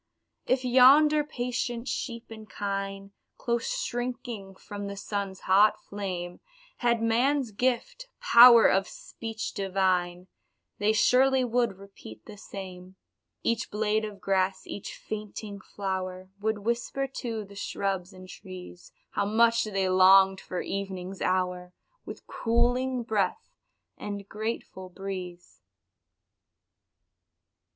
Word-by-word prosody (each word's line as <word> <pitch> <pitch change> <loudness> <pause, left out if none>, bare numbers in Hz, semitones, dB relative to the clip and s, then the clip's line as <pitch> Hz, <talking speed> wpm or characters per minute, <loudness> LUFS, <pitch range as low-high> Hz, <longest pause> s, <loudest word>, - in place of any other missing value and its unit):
If 255 0 +1
yonder 285 +5 +6
patient 245 -3 -3
sheep 235 -3 -4
and 220 -1 -10
kine, 195 -1 -4 0.3
Close 235 -1 -1 0.2
shrinking 240 -5 -5
from 205 +1 -7
the 200 0 -6
sun's 200 -2 -4
hot 200 +3 +4
flame, 180 -3 -5 0.4
Had 235 -2 +1
man's 245 +2 +2
gift 250 - -1
"power 235 -1 +8
of 195 +1 +3
speech 225 -1 -7
divine," 185 -2 0 0.5
They 205 +1 +3
surely 260 +4 +4
would 235 -4 0
repeat 195 - -13
the 210 - -10
same 185 -2 -9 0.5
Each 230 -1 0
blade 215 +1 0
of 210 -2 -6
grass, 190 0 0
each 205 - -7
fainting 210 -1 -7
flower, 185 -1 -5
Would 220 +1 0
whisper 235 +5 -2
to 225 -4 -4
the 200 - -14
shrubs 195 -2 -3
and 185 -1 -12
trees, 185 -2 -11 0.2
How 200 - 0
much 230 +2 +3
they 195 -3 -1
longed 190 +1 +6
for 180 - -4
evening's 195 -1 -5
hour, 180 -1 -1 0.3
With - - -9
cooling 245 +2 0
breath 205 -5 -1 0.5
and 200 -1 -6
grateful 210 -3 -5
breeze. 180 -2 -8
205 Hz, 115 wpm, -28 LUFS, 190-235 Hz, 0.5 s, power